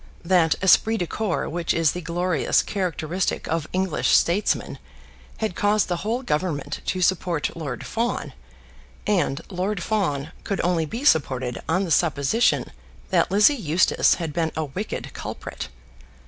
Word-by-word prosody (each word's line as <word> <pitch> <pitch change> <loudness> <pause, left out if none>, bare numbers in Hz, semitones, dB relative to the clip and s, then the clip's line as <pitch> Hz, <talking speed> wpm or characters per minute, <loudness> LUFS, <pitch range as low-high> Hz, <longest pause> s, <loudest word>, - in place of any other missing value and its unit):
That 170 -3 +4
esprit 220 +4 +5
de 175 - -1
corps 205 0 -2
which 170 0 -1
is 165 -2 +3
the 180 - -5
glorious 170 -1 +1
characteristic 180 -2 -2
of 160 -1 -1
English 185 -3 +2
statesmen 185 +5 0 0.6
had 220 -4 -2
caused 205 0 +2
the 175 - 0
whole 230 +7 -2
Government 155 - -2
to 185 -1 0
support 170 -3 0
Lord 145 -7 -5
Fawn, 235 +1 -2 0.7
and 180 -9 +1
Lord 185 0 -2
Fawn 160 -9 -1
could 200 - -2
only 170 -3 +1
be 235 - -5
supported 130 - +2
on 185 +4 +2
the 175 - -4
supposition 160 - +2 0.4
that - - +3
Lizzie 210 +8 +5
Eustace 185 - +3
had 165 -4 -4
been 160 0 0
a 160 - -1
wicked 185 +10 -5
culprit. - - -6
175 Hz, 145 wpm, -24 LUFS, 160-200 Hz, 0.7 s, esprit